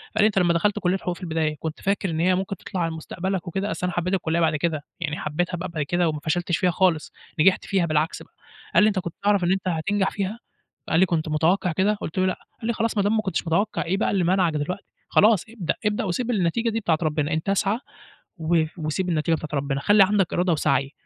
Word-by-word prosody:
قال 220 - +4
لي: - - +7
"أنت 205 -3 +1
لمّا 175 -2 +3
دخلت 205 +5 +1
كُلّية 180 +1 +1
حقوق 180 -2 -3
في 175 - -15
البداية، 160 -2 -1
كنت 160 -1 -5
فاكر 195 -1 0
إن 160 -1 -2
هي 180 +2 +3
ممكن 195 +1 -2
تطلع 185 -3 -5
على 165 -1 0
مستقبلك 180 +3 -4
وكده؟" 195 +4 -2
أصل 180 - -2
أنا 180 - -4
حبّيت 180 +2 0
الكُلّية 170 -3 0
بعد 160 -2 +2
كده، 155 0 -1 0.2
يعني 160 -2 -3
حبّيتها 175 +4 -2
بقى 180 +2 -5
بعد 160 -3 -2
كده 175 +3 +1
وما 155 -1 -3
فشلتش 175 +3 0
فيها 180 - +2
خالص، 175 -3 +1 0.3
نجحت 185 +4 +4
فيها 190 -3 +1
بالعكس 155 0 0
بقى، - - -24 0.4
قال - - +7
لي: - - +6
"أنت 205 -3 +1
كنت 170 -2 -5
تعرف 205 -2 +3
إن 175 - +2
أنت 190 0 -1
هتنجح 190 +4 0
فيها؟" 205 +3 -3 0.5
قال 165 - +3
لي: 190 - +6
"كنت 160 -3 -1
متوقّع 170 +4 +2
كده؟" 190 +6 +2
قُلت 185 -3 -5
له: 185 - +3
"لأ." 185 - -1 0.2
قال 225 - -5
لي: 235 - +1
"خلاص 225 0 -1
ما 200 - +3
دام 205 +2 +2
ما - - +2
كنتش 190 -4 -2
متوقّع، 200 +7 +1
إيه 185 +3 0
بقى 215 - +1
اللي 195 -3 +1
مانعك 180 -1 +2
دلوقتي؟ 155 +6 -3 0.3
خلاص 210 -3 +5
ابدأ، 215 -7 -2
ابدأ 210 +3 +1
وسيب 225 +6 -1
النتيجة 215 +3 +1
دي 225 0 -1
بتاعة 170 -7 +1
ربنا. 155 0 0
أنت 160 +4 -2
اسعَ 200 +2 +1 0.6
و 160 0 +2
وسيب 160 +4 -2
النتيجة 165 -1 +1
بتاعة 155 -2 -2
ربِّنا. 140 0 -2
خلّي 205 +7 +5
عندك 195 -2 +1
إرادة 180 0 +1
وسَعي." 140 -3 +1
180 Hz, 245 wpm, -24 LUFS, 160-195 Hz, 0.6 s, لي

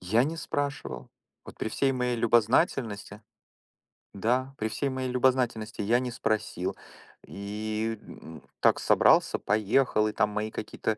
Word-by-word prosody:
Я 110 +7 +2
не 160 +4 -3
спрашивал. 140 - -4 0.4
Вот - - -12
при - - -3
всей 135 +4 +1
моей 125 -1 -1
любознательности 115 - +1 0.9
Да, 125 +7 0
при 110 - -2
всей 135 +5 -2
моей 130 -1 -3
любознательности, 125 -4 +1
я 115 +4 +3
не 125 -1 -3
спросил. 110 -5 -2 0.5
И, 110 +2 -4
м, 80 -2 -12 0.2
так - - +4
собрался, - - +4
поехал. 110 +1 +2
И, 105 - -3
там, 105 0 +1
мои 105 +1 -2
какие-то 110 0 -3
110 Hz, 135 wpm, -28 LUFS, 105-125 Hz, 0.9 s, так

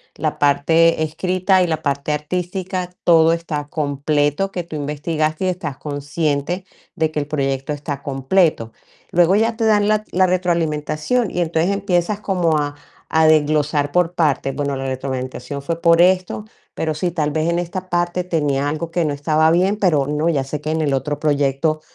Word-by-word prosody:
la 155 0 -2
parte 160 +3 +3
escrita, 185 +4 +1
y - - 0
la 160 -2 -2
parte 140 +1 -1
artística, 180 +4 -3 0.2
todo 165 -1 +6
está 165 -3 -3
completo, 145 +4 0
que 175 - -3
tú 170 -1 -9
investigaste, 155 +3 -2
y - - +1
estás 175 -7 -3
consciente, 145 +4 -2 0.3
de 160 - +1
que 155 - -2
el 145 - -3
proyecto 135 -1 -2
está 145 -1 -5
completo. 135 -3 +1 0.4
Luego, 175 +2 +4
ya 225 +2 +2
te 225 - -2
dan 210 -2 +3
la 215 0 +2
la 185 +1 +3
retroalimentación, 170 +4 0
y - - -3
entonces, 165 +1 +1
empiezas 200 0 0
como 175 -6 +1
a 145 -1 -2 0.4
a 160 0 +4
desglosar 150 -1 +2
por 175 0 +1
partes: 150 -5 0
"Bueno, 140 -1 -2
la 135 0 -4
retroalimentación, 130 +1 -4
fue 165 +3 -3
por 170 0 +5
esto, 185 +3 +2 0.3
pero 160 -1 -1
sí, 165 +4 -1
tal 155 -3 -1
vez, 155 +2 0
en 170 - +1
esta 180 +2 -4
parte, 175 +1 0
tenía 145 -5 0
algo 160 +2 -4
que 170 0 0
no 150 -2 0
estaba 155 +2 +2
bien, 185 +5 +2
pero 165 -9 +2
no, 150 +3 0
ya 140 -5 +1
sé 145 +2 -5
que 155 - -4
en 160 0 0
el 145 -3 0
otro 145 +2 -2
proyecto 145 +1 +1
155 Hz, 180 wpm, -20 LUFS, 145-175 Hz, 0.4 s, todo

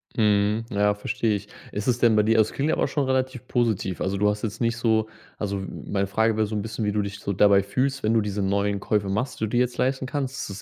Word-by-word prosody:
Mhm, 105 0 +2
ja, 105 -1 +2
verstehe 105 +1 -1
ich. 100 - -6 0.2
Ist 105 +4 -4
es 120 -1 +2
denn 115 -3 +4
bei 105 - +5
dir 115 +1 +3
also, 110 -1 +4
es - - -13
klingt 145 +3 -1
ja - - +1
auch - - +1
schon 145 -3 -1
relativ 130 -1 -1
positiv. 110 -7 0
Also, 95 +1 -1
du 105 +1 +3
hast 105 +1 -3
jetzt 110 +2 -4
nicht 115 0 +1
so 110 -2 +2 0.3
also, 100 -1 -2
m 95 - -7
meine 100 -1 +1
Frage 110 +2 +1
wär 110 - +2
so 105 +1 -4
'n 105 - -1
bisschen, 110 0 -4
wie 105 - +1
du 105 0 0
dich 100 0 -5
so 100 - -3
dabei 100 0 +5
fühlst, 130 +6 -1
wenn 110 +1 +2
du 115 - +4
diese 100 0 -3
neuen 100 +1 0
Käufe 100 -1 0
machst, 125 +6 -2
die 110 - 0
du - - -5
dir 120 - +1
jetzt 125 0 -1
leisten 130 0 0
kannst. 135 -1 -3
Ist 100 0 -7
110 Hz, 285 wpm, -25 LUFS, 100-120 Hz, 0.3 s, bei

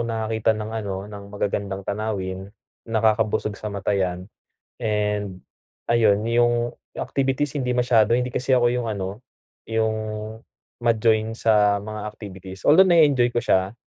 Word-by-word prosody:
nakakakita 110 -1 0
ng 110 +1 -5
ano, 105 -4 -3
ng 100 -1 -9
magagandang 100 -1 -3
tanawin, 100 -3 -3 0.4
nakakabusog 110 -1 +1
sa 110 - -7
mata, 100 +1 -1
'yan. 90 0 -2 0.5
And 105 -3 -1 0.5
ayon, 110 -3 +3
yung 120 0 +1 0.2
activities 135 +1 -1
hindi 125 -2 -1
masyado, 120 -3 +3
hindi 125 0 -1
kasi 130 +1 -1
ako 120 -1 +4
yung 120 -2 -2
ano, 100 +2 -5 0.5
yung 110 -1 +1 0.9
ma-join 110 -1 +2
sa 105 -2 +3
mga 110 0 -6
activities, 95 -3 -10
although 160 +6 +8
na-e-enjoy 145 -8 +4
ko 120 - 0
siya, 95 +3 +1
110 Hz, 130 wpm, -23 LUFS, 100-120 Hz, 0.9 s, although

